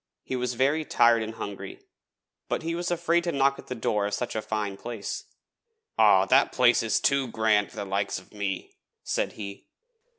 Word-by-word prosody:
He 130 - -4
was 125 -1 -2
very 140 +5 +2
tired 120 -5 +4
and 110 0 -5
hungry, 235 - -7 0.7
but - - -1
he 165 +1 -2
was 175 +1 -2
afraid 170 0 +1
to 170 - 0
knock 140 -1 +2
at - - -12
the 125 - -4
door 105 -3 0
of 105 - -2
such 120 0 -4
a 110 - -1
fine 105 -2 -3
place. 115 0 -6 0.7
'Aw, - - +6
that - - +4
place - - +4
is - - +1
too 140 -2 +2
gran' 110 -3 +2
for - - -17
the 100 - -4
likes 100 +1 -1
of 95 - -13
me!' 100 -3 -4 0.3
said - - -1
he. 100 -2 -8
115 Hz, 195 wpm, -27 LUFS, 105-140 Hz, 0.7 s, Aw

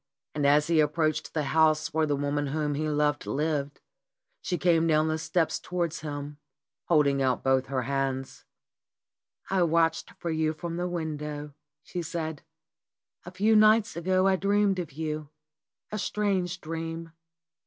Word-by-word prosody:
And 145 -2 +1
as 150 +1 +5
he 165 0 +2
approached 155 +1 +1
the 155 - +1
house 155 -1 +3
where 160 0 +2
the 145 - +1
woman 145 +1 -1
whom 150 +1 -1
he 155 +2 -1
loved 150 0 0
lived, 145 -1 -2 0.6
she 180 - -2
came 165 -2 +3
down 155 0 +3
the 155 0 -1
steps 165 0 0
towards 175 -3 -2
him, 145 -1 -6 0.5
holding 145 -4 +3
out 130 -2 +1
both 130 0 +2
her 130 -2 -1
hands. 135 0 -2 1.1
"I 190 -1 +2
watched 165 -1 +2
for 170 - -3
you 155 0 0
from 170 +2 -5
the 175 +1 -1
window," 150 -3 -4 0.3
she 180 - -5
said. 160 -2 -4 0.9
"A - - -6
few 210 +4 +2
nights 215 +1 +5
ago 185 +2 +1
I 190 -1 +4
dreamed 200 0 +2
of 170 -4 -4
you, 155 0 -4 0.6
a 215 - -3
strange 190 -4 -1
dream. 165 +1 -5
160 Hz, 155 wpm, -28 LUFS, 145-175 Hz, 1.1 s, as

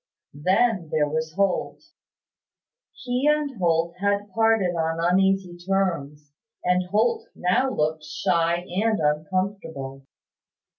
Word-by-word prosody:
Then 185 - +1
there 150 -1 +1
was 160 +1 -3
Holt. 195 -2 0 1.1
He 250 +2 -2
and 300 -2 +1
Holt 170 -1 +1
had 200 0 0
parted 225 -5 +2
on 165 0 -1
uneasy 190 +1 +2
terms; 165 -7 -2 0.3
and 180 0 +1
Holt 225 +4 +1
now 180 +9 +1
looked 155 -7 -1
shy 170 +3 0
and 215 +3 0
uncomfortable. 150 -3 -2
180 Hz, 105 wpm, -24 LUFS, 160-200 Hz, 1.1 s, parted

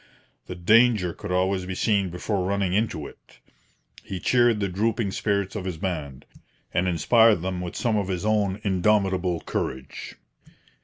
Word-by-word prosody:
The 90 - -6
danger 105 0 +4
could 105 -3 -7
always 95 0 0
be 95 - -4
seen 100 -2 +1
before 90 +3 -2
running 100 -1 0
into 100 -8 -1
it. - - -15 0.7
He 95 - -6
cheered 120 +1 +3
the 100 - 0
drooping 105 +2 -1
spirits 100 0 -1
of 100 - -3
his 90 -4 -4
band, 75 -7 -5 0.5
and 90 +2 +1
inspired 110 +2 +4
them 90 -1 -3
with 90 -1 -6
some 115 -3 0
of 100 -2 -1
his 95 +1 -3
own 105 -2 +1
indomitable 95 -2 +1
courage. 65 0 -5
95 Hz, 155 wpm, -25 LUFS, 90-105 Hz, 0.7 s, danger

